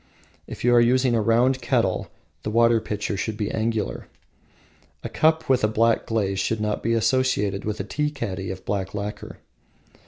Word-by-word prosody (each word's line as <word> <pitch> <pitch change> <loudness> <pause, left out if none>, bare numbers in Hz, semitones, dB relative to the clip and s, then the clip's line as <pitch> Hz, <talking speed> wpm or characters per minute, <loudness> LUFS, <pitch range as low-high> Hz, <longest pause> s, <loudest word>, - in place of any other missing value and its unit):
If - - -8
you 120 0 +4
are 120 - +6
using 125 +1 +3
a 115 - +2
round 125 +4 +2
kettle, 115 -6 0 0.3
the - - -4
water 115 +1 +3
pitcher 105 -1 -3
should 105 +2 -3
be 105 -2 -2
angular. 110 -1 -2 1.0
A - - -4
cup 160 0 +2
with 130 -3 +2
a - - +5
black 115 +1 +1
glaze 100 -4 -1
should 110 +3 -1
not 105 0 -2
be 115 - 0
associated 110 -4 +1
with 105 0 -3
a - - -2
tea 150 +9 -1
caddy 100 -10 -5
of 95 0 -7
black 95 -1 -3
lacquer. 105 +1 -6
110 Hz, 180 wpm, -24 LUFS, 105-120 Hz, 1.0 s, are